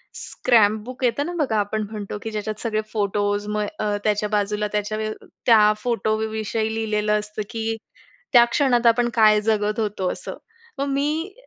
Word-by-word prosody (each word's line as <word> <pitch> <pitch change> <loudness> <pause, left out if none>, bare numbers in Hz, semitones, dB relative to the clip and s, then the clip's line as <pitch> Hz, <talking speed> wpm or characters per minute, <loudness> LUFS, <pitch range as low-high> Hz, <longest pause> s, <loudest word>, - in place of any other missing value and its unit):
Scrapbook 230 +2 +1
येतं 250 +4 +1
ना 350 - -4
बघा, 220 -6 0
आपण 210 +1 -1
म्हणतो 210 -1 -5
की 225 - -5
ज्याच्यात 215 0 -4
सगळे 215 -2 -1
फोटोस, 205 0 0
मग 210 0 -1
अ, 210 -1 0
त्याच्या 210 0 +1
बाजूला 210 0 0
त्याच्या 210 +1 -2
व्य 215 0 -2
अ, - - -16 0.2
त्या 215 -3 +6
फोटोविषयी 220 -1 -1
लिहिलेलं 210 -1 0
असतं 210 0 -6
की 225 0 -2 0.6
त्या 240 -2 +9
क्षणात 245 -1 +1
आपण 240 +1 +4
काय 215 -2 +5
जगत 210 0 0
होतो? 205 -4 -1
असं. - - -7 0.4
मग 275 - -1
मी 300 +7 -1
215 Hz, 160 wpm, -23 LUFS, 210-230 Hz, 0.6 s, त्या